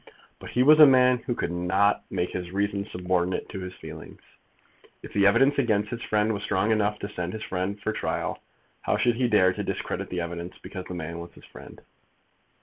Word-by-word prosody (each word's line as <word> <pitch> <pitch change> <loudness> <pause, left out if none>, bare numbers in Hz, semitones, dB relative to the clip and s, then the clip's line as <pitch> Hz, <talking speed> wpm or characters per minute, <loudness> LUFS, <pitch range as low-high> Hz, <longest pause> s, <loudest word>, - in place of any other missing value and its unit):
But - - -9
he 125 - +2
was 155 +3 +7
a 150 - +11
man 125 -1 +5
who 120 +1 -3
could - - -2
not 95 +4 +1
make 90 - -2
his 90 -1 -5
reason 100 +1 -2
subordinate 90 -1 -1
to 95 - -6
his 90 -1 -7
feelings. 80 0 -11 0.8
If - - -10
the 100 -1 +4
evidence 135 +7 +4
against 105 -5 +1
his 120 - -5
friend 105 0 +1
was 100 - -4
strong 100 +1 0
enough 105 -1 +1
to - - -3
send 90 -3 -4
his 110 0 -5
friend 95 +2 -3
for 110 +1 -2
trial, - - -3 0.4
how - - 0
should 120 -2 +2
he 125 -1 +2
dare 95 -4 +4
to - - -4
discredit - - -4
the 90 -1 -2
evidence 85 +1 -6
because 95 -2 -8
the 90 - -7
man 85 0 -5
was 85 0 -9
his - - -15
friend? - - -13
100 Hz, 210 wpm, -26 LUFS, 90-110 Hz, 0.8 s, a